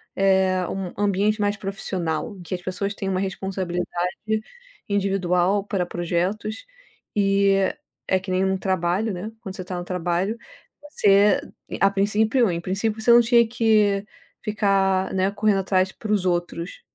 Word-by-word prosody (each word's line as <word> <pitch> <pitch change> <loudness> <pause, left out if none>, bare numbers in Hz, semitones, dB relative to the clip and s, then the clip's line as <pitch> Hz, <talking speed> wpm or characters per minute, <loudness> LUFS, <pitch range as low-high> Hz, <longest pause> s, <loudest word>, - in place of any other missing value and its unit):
eh, 190 -1 +2
um 190 -2 -4
ambiente 205 +2 +1
mais 205 0 +1
profissional, 190 -1 -3
em - - -11
que 175 +1 -4
as 180 - -7
pessoas 200 +2 -3
têm 195 - -3
uma 185 -1 0
responsabilidade 190 -2 -3 1.0
individual 195 -1 +1
para 195 -4 -1
projetos 180 - -2 0.5
e 200 -1 +3 0.5
é 190 - +2
que 190 0 -7
nem 185 +1 +2
um 190 0 +1
trabalho, 190 +3 0
né, 185 +4 -5
quando 190 -4 -7
você 185 - -6
está 180 0 -5
no 175 - -4
trabalho, 180 +4 -1 0.5
você 200 -5 +4 0.4
a 195 - +4
princípio 215 +4 +2
em 170 -1 -1
princípio, 210 +4 -2
você 235 +2 +4
não 240 0 +8
tinha 235 0 +4
que 215 -4 +2 0.4
ficar, 195 -3 +1
né, 190 0 +2
correndo 205 -1 +2
atrás 190 0 +1
para 215 +1 -6
os 200 -3 +1
outros, 175 0 -2
195 Hz, 150 wpm, -23 LUFS, 185-205 Hz, 1.0 s, não